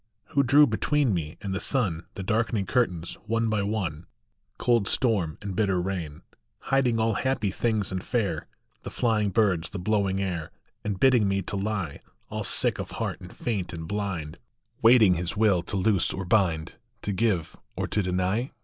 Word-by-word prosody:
Who 140 Hz, -, +3 dB
drew 140 Hz, +3 st, +6 dB
between 135 Hz, +1 st, +1 dB
me 80 Hz, -3 st, -3 dB
and 100 Hz, -2 st, -3 dB
the 95 Hz, -, -1 dB
sun 95 Hz, -, 0 dB
The 95 Hz, -, -5 dB
darkening 110 Hz, 0 st, 0 dB
curtains, 90 Hz, -8 st, -1 dB
one 115 Hz, 0 st, +1 dB
by 105 Hz, -1 st, +1 dB
one, 95 Hz, -6 st, -3 dB, 0.5 s
Cold 115 Hz, -5 st, +2 dB
storm 100 Hz, -, 0 dB
and 100 Hz, -2 st, -4 dB
bitter 95 Hz, -3 st, +1 dB
rain, 90 Hz, -5 st, -4 dB, 0.5 s
Hiding 125 Hz, -4 st, +3 dB
all 110 Hz, 0 st, +2 dB
happy 110 Hz, -3 st, 0 dB
things 105 Hz, -3 st, -1 dB
and 95 Hz, -1 st, -3 dB
fair, 100 Hz, -10 st, -1 dB, 0.3 s
The -, -, -6 dB
flying 110 Hz, -4 st, +1 dB
birds, 95 Hz, -5 st, +1 dB
the -, -, -6 dB
blowing 95 Hz, 0 st, 0 dB
air, 90 Hz, -5 st, -3 dB, 0.3 s
And 100 Hz, -3 st, -3 dB
bidding 125 Hz, -4 st, +5 dB
me 100 Hz, 0 st, 0 dB
to 100 Hz, -, -5 dB
lie, 100 Hz, -6 st, -2 dB, 0.3 s
All -, -, -3 dB
sick -, -, +2 dB
of -, -, -4 dB
heart -, -, -3 dB
and 90 Hz, -, -10 dB
faint 100 Hz, -8 st, -3 dB
and 80 Hz, -1 st, -6 dB
blind, 95 Hz, -6 st, -3 dB, 0.4 s
Waiting 115 Hz, -5 st, +7 dB
his 90 Hz, +3 st, -2 dB
will 105 Hz, -5 st, +4 dB
to 95 Hz, +4 st, -4 dB
loose 95 Hz, -1 st, +2 dB
or 95 Hz, -, -4 dB
bind, 90 Hz, -5 st, +1 dB, 0.3 s
To 105 Hz, -, -1 dB
give 95 Hz, -5 st, 0 dB, 0.2 s
or -, -, -2 dB
to 105 Hz, -, +1 dB
deny? 95 Hz, +7 st, -1 dB
100 Hz, 175 wpm, -26 LUFS, 90-110 Hz, 0.5 s, Waiting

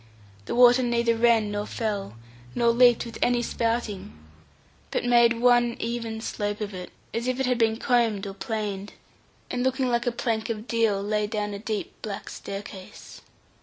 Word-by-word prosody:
The -, -, -3 dB
water 245 Hz, +1 st, +7 dB
neither 235 Hz, -1 st, +1 dB
ran 225 Hz, -2 st, +3 dB
nor 205 Hz, 0 st, -3 dB
fell, 205 Hz, -, -3 dB, 0.4 s
nor 235 Hz, -1 st, +3 dB
leaped 240 Hz, 0 st, +5 dB
with 230 Hz, -, -8 dB
any 245 Hz, -1 st, +2 dB
spouting, 225 Hz, -, -2 dB, 0.7 s
but -, -, -2 dB
made 235 Hz, -1 st, +4 dB
one 240 Hz, -1 st, +4 dB
even 230 Hz, -1 st, -3 dB
slope 205 Hz, -2 st, -3 dB
of 210 Hz, -2 st, -4 dB
it, 180 Hz, -1 st, -7 dB, 0.2 s
as 235 Hz, +2 st, -2 dB
if 255 Hz, 0 st, -1 dB
it 265 Hz, -, +1 dB
had 250 Hz, -1 st, +1 dB
been 225 Hz, -1 st, +2 dB
combed 230 Hz, -5 st, +1 dB
or 195 Hz, -, -5 dB
planed, 205 Hz, -2 st, -4 dB, 0.6 s
and 245 Hz, -, -1 dB
looking 260 Hz, 0 st, +1 dB
like 240 Hz, +1 st, 0 dB
a -, -, +3 dB
plank 230 Hz, -2 st, -2 dB
of 220 Hz, 0 st, -4 dB
deal 225 Hz, -4 st, +1 dB
laid 210 Hz, 0 st, 0 dB
down 210 Hz, -2 st, -2 dB
a 200 Hz, -, -5 dB
deep 215 Hz, -1 st, -4 dB
black 205 Hz, -2 st, -6 dB
staircase. 195 Hz, -1 st, -9 dB
230 Hz, 170 wpm, -26 LUFS, 210-240 Hz, 0.7 s, water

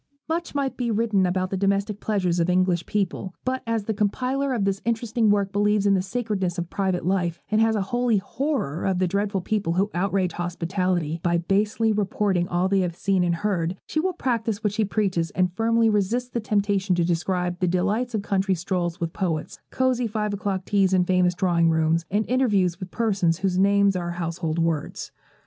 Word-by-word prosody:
Much 330 Hz, 0 st, -3 dB
might 275 Hz, -2 st, -1 dB
be 245 Hz, -2 st, -1 dB
written 215 Hz, -4 st, +2 dB
about 185 Hz, +1 st, -1 dB
the -, -, 0 dB
domestic 200 Hz, +2 st, 0 dB
pleasures 185 Hz, -5 st, 0 dB
of 170 Hz, +1 st, +1 dB
English 180 Hz, -1 st, +1 dB
people, 195 Hz, -2 st, -2 dB
but 260 Hz, 0 st, -1 dB
as 225 Hz, -2 st, 0 dB
the 220 Hz, -, -2 dB
compiler 255 Hz, +7 st, 0 dB
of 230 Hz, -6 st, 0 dB
this 195 Hz, 0 st, -1 dB
interesting 230 Hz, -1 st, +1 dB
work 200 Hz, -1 st, +2 dB
believes 205 Hz, 0 st, +2 dB
in 200 Hz, -, +4 dB
the 190 Hz, -, +2 dB
sacredness 195 Hz, -4 st, -2 dB
of 175 Hz, -1 st, -4 dB
private 190 Hz, -4 st, -1 dB
life, 175 Hz, -3 st, 0 dB
and 215 Hz, +1 st, +3 dB
has 225 Hz, 0 st, +3 dB
a 205 Hz, -, 0 dB
holy 240 Hz, +2 st, +1 dB
horror 200 Hz, -, -2 dB
of 190 Hz, -1 st, +1 dB
the 185 Hz, 0 st, +1 dB
dreadful 200 Hz, +1 st, -1 dB
people 200 Hz, -3 st, -1 dB
who 195 Hz, +4 st, +1 dB
outrage 185 Hz, 0 st, 0 dB
hospitality 175 Hz, -1 st, -2 dB
by 170 Hz, -1 st, +1 dB
basely 210 Hz, +5 st, +1 dB
reporting 195 Hz, -3 st, 0 dB
all 180 Hz, +1 st, +1 dB
they 195 Hz, 0 st, +2 dB
have 175 Hz, -2 st, -1 dB
seen 190 Hz, 0 st, +1 dB
and 170 Hz, -1 st, +1 dB
heard, 180 Hz, -1 st, -1 dB
she 310 Hz, -, -2 dB
will 370 Hz, +4 st, +1 dB
practise 230 Hz, -, -2 dB
what 210 Hz, -2 st, 0 dB
she 220 Hz, -, +1 dB
preaches, 190 Hz, -5 st, 0 dB
and 180 Hz, -1 st, +1 dB
firmly 230 Hz, +2 st, +2 dB
resist 220 Hz, +4 st, 0 dB
the 235 Hz, -, 0 dB
temptation 205 Hz, -3 st, +1 dB
to 175 Hz, -1 st, +1 dB
describe 175 Hz, +1 st, -1 dB
the 180 Hz, -, +1 dB
delights 205 Hz, +7 st, 0 dB
of 205 Hz, -, -2 dB
country 195 Hz, -1 st, +1 dB
strolls 175 Hz, 0 st, -2 dB
with 165 Hz, -2 st, -3 dB
poets, 170 Hz, -6 st, -3 dB
cosey 255 Hz, -2 st, +1 dB
five 210 Hz, -1 st, -2 dB
o'clock 195 Hz, -2 st, -2 dB
teas 195 Hz, -1 st, +2 dB
in 180 Hz, -1 st, +3 dB
famous 180 Hz, -1 st, +2 dB
drawing 170 Hz, -2 st, +2 dB
rooms, 160 Hz, +1 st, +1 dB
and 210 Hz, +3 st, 0 dB
interviews 205 Hz, -9 st, +2 dB
with 185 Hz, -2 st, -6 dB
persons 195 Hz, -7 st, +1 dB
whose 185 Hz, -1 st, 0 dB
names 200 Hz, 0 st, +4 dB
are 175 Hz, -1 st, -2 dB
household 170 Hz, -1 st, -3 dB
words. 165 Hz, -3 st, -2 dB
195 Hz, 200 wpm, -24 LUFS, 180-215 Hz, -, in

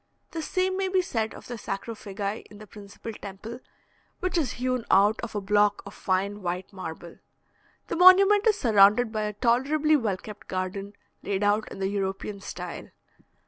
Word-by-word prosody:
The 325 Hz, -, -4 dB
same 370 Hz, +3 st, 0 dB
may 390 Hz, 0 st, 0 dB
be 375 Hz, -1 st, +2 dB
said 220 Hz, -9 st, -2 dB
of -, -, -12 dB
the 240 Hz, -2 st, -7 dB
sarcophagi 200 Hz, 0 st, -4 dB
in 210 Hz, -, -13 dB
the 215 Hz, -, -11 dB
principal 210 Hz, +2 st, -10 dB
temple, 210 Hz, +4 st, -8 dB, 0.6 s
which 370 Hz, 0 st, -2 dB
is 315 Hz, -6 st, 0 dB
hewn 255 Hz, -1 st, -1 dB
out 205 Hz, +3 st, +4 dB
of 220 Hz, -, -6 dB
a 205 Hz, -, -1 dB
block 205 Hz, +1 st, +2 dB
of 200 Hz, -, -9 dB
fine 200 Hz, +2 st, -1 dB
white 180 Hz, +2 st, -4 dB
marble. 170 Hz, -2 st, -8 dB, 0.7 s
The -, -, -3 dB
monument 390 Hz, +4 st, +7 dB
is 425 Hz, -2 st, +4 dB
surrounded 220 Hz, -, +5 dB
by 215 Hz, -1 st, -1 dB
a 210 Hz, -, -3 dB
tolerably 270 Hz, +8 st, +2 dB
well 220 Hz, -9 st, 0 dB
kept 210 Hz, +2 st, -11 dB
garden, 190 Hz, +2 st, -4 dB, 0.3 s
laid 200 Hz, 0 st, -2 dB
out 205 Hz, +1 st, +1 dB
in -, -, -8 dB
the 190 Hz, 0 st, -1 dB
European 195 Hz, 0 st, -3 dB
style. -, -, -7 dB
210 Hz, 175 wpm, -26 LUFS, 195-255 Hz, 0.7 s, monument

